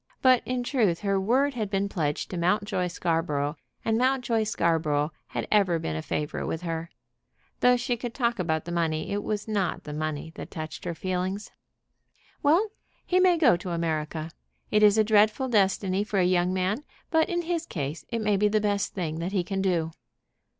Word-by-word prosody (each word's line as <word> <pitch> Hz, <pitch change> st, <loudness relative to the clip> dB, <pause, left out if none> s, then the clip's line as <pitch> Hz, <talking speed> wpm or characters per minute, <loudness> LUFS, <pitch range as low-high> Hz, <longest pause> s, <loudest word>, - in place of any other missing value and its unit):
But 255 Hz, -2 st, +6 dB
in 250 Hz, -1 st, -1 dB
truth 220 Hz, -10 st, +1 dB
her 195 Hz, -1 st, +1 dB
word 265 Hz, +8 st, +2 dB
had 220 Hz, -5 st, -3 dB
been 195 Hz, 0 st, 0 dB
pledged 150 Hz, -7 st, -2 dB
to 180 Hz, -, -3 dB
Mountjoy 185 Hz, +1 st, +1 dB
Scarborough, 160 Hz, -4 st, -1 dB, 0.3 s
and 225 Hz, 0 st, +2 dB
Mountjoy 250 Hz, -4 st, +1 dB
Scarborough 160 Hz, -6 st, +1 dB, 0.2 s
had -, -, -4 dB
ever 195 Hz, -5 st, +4 dB
been 80 Hz, -, -3 dB
a 80 Hz, -, -2 dB
favorite 150 Hz, -, -3 dB
with 165 Hz, +2 st, -3 dB
her. 165 Hz, -1 st, -3 dB, 0.7 s
Though 250 Hz, 0 st, +5 dB
she 240 Hz, 0 st, -1 dB
could 235 Hz, 0 st, -6 dB
talk 235 Hz, -4 st, 0 dB
about 160 Hz, -3 st, -1 dB
the 170 Hz, -, -5 dB
money, 165 Hz, -1 st, -1 dB
it 205 Hz, +1 st, -1 dB
was 210 Hz, 0 st, -3 dB
not 205 Hz, -4 st, -1 dB
the 150 Hz, -, -7 dB
money 155 Hz, 0 st, -3 dB
that -, -, -8 dB
touched 155 Hz, +2 st, -7 dB
her 170 Hz, -1 st, -3 dB
feelings. 185 Hz, +3 st, -3 dB, 0.9 s
"Well; 340 Hz, +9 st, +3 dB, 0.4 s
he 365 Hz, -, +2 dB
may 365 Hz, -2 st, +5 dB
go 280 Hz, -, +5 dB
to 180 Hz, +1 st, -7 dB
America. 160 Hz, -1 st, -2 dB, 0.4 s
It 210 Hz, -, +4 dB
is 210 Hz, 0 st, +6 dB
a 220 Hz, -, +6 dB
dreadful 215 Hz, +4 st, +3 dB
destiny 195 Hz, -2 st, +2 dB
for 210 Hz, -1 st, -3 dB
a 185 Hz, -, +4 dB
young 180 Hz, 0 st, +2 dB
man, 190 Hz, +8 st, -1 dB, 0.3 s
but 320 Hz, -1 st, +3 dB
in 345 Hz, -1 st, -1 dB
his 335 Hz, -1 st, -2 dB
case 150 Hz, +1 st, -4 dB
it 230 Hz, -2 st, -2 dB
may 210 Hz, -1 st, +2 dB
be 210 Hz, +2 st, +3 dB
the 215 Hz, +1 st, +2 dB
best 205 Hz, -1 st, -1 dB
thing 165 Hz, -4 st, -3 dB
that 175 Hz, +4 st, -3 dB
he 185 Hz, -3 st, +1 dB
can 195 Hz, +2 st, -2 dB
do." 170 Hz, -4 st, +1 dB
195 Hz, 190 wpm, -27 LUFS, 165-225 Hz, 0.9 s, But